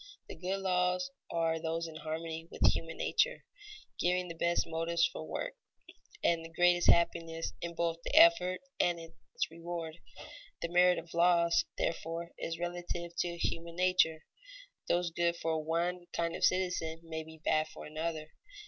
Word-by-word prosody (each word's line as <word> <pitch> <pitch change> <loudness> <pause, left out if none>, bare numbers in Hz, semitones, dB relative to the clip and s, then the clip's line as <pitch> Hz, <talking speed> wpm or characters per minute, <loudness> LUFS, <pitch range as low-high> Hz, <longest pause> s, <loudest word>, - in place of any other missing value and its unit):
The - - -8
good 185 +4 -3
laws 180 -1 +1 0.2
are 165 -1 0
those 165 +1 -2
in 160 -1 -8
harmony 160 +1 -5
with - - +3
human 165 0 -5
nature, - - +1 0.5
giving 180 0 +1
the - - -4
best 170 +1 +1
motives 165 +1 +1
for - - -4
work - - -3 0.7
and 165 -1 +2
the 165 - -8
greatest 175 +1 +4
happiness 165 -1 +2 0.2
both 165 0 0
in - - -27
the - - -2
effort 180 +4 +6 0.2
and 175 -1 +2
in 165 0 -11 0.2
its - - -1
reward. 165 -1 -6 0.6
The 170 - -1
merit 180 +1 +5
of 170 - -7
laws, 170 0 +4
therefore, 165 +1 -2
is 165 0 -3
relative 175 0 -4
to 170 -1 -1
human 170 0 -2
nature; 180 -3 +3 0.6
those 175 0 +1
good 170 0 +1
for 160 -1 -1
one 175 +2 -1
kind 170 0 -1
of - - -5
citizens 180 -3 +1
may 160 -1 -5
be 160 0 -12
bad 155 0 +3
for - - -10
another. 155 0 -4
170 Hz, 160 wpm, -32 LUFS, 165-175 Hz, 0.7 s, effort